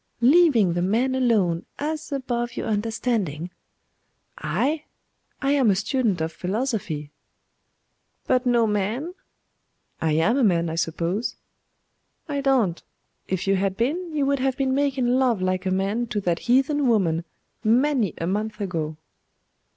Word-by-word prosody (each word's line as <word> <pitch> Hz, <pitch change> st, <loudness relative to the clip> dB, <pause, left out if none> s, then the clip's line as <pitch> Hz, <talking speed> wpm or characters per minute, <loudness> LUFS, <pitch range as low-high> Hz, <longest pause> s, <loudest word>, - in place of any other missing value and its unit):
leaving 250 Hz, -, +5 dB
the 175 Hz, -, -1 dB
man 230 Hz, +8 st, +1 dB
alone, 210 Hz, -10 st, +2 dB
as 310 Hz, +1 st, -4 dB
above 240 Hz, -3 st, -2 dB
your -, -, -2 dB
understanding.' 210 Hz, -, -1 dB, 0.9 s
'I? 240 Hz, -, -1 dB, 0.6 s
I 275 Hz, -, +2 dB
am 270 Hz, -6 st, +4 dB
a 195 Hz, -, +4 dB
student 215 Hz, -, 0 dB
of 160 Hz, 0 st, -1 dB
philosophy.' 185 Hz, -, -3 dB, 1.1 s
'But 255 Hz, 0 st, +1 dB
no 240 Hz, -2 st, +4 dB
man?' 220 Hz, -, -1 dB, 0.9 s
'I 160 Hz, -, +1 dB
am 165 Hz, -, +2 dB
a 275 Hz, -, +2 dB
man, 170 Hz, -5 st, +2 dB
I -, -, -3 dB
suppose.' 170 Hz, +6 st, -1 dB, 0.9 s
'I 285 Hz, -2 st, -2 dB
don't; 250 Hz, -11 st, +1 dB, 0.4 s
if 185 Hz, -1 st, -2 dB
you 195 Hz, 0 st, +2 dB
had 195 Hz, 0 st, -1 dB
been, 325 Hz, +9 st, -1 dB
you 295 Hz, -2 st, 0 dB
would 280 Hz, 0 st, +1 dB
have 265 Hz, 0 st, 0 dB
been 265 Hz, -1 st, +1 dB
making 275 Hz, -2 st, +1 dB
love 250 Hz, -3 st, +2 dB
like 185 Hz, +1 st, -1 dB
a -, -, +2 dB
man 200 Hz, +5 st, 0 dB
to 210 Hz, -2 st, -2 dB
that 175 Hz, -3 st, 0 dB
heathen 275 Hz, +3 st, +3 dB
woman 175 Hz, -8 st, +2 dB, 0.4 s
many 240 Hz, -, +2 dB
a 165 Hz, -, -3 dB
month 210 Hz, +4 st, -2 dB
ago. 160 Hz, -6 st, -3 dB
225 Hz, 145 wpm, -24 LUFS, 185-265 Hz, 1.1 s, leaving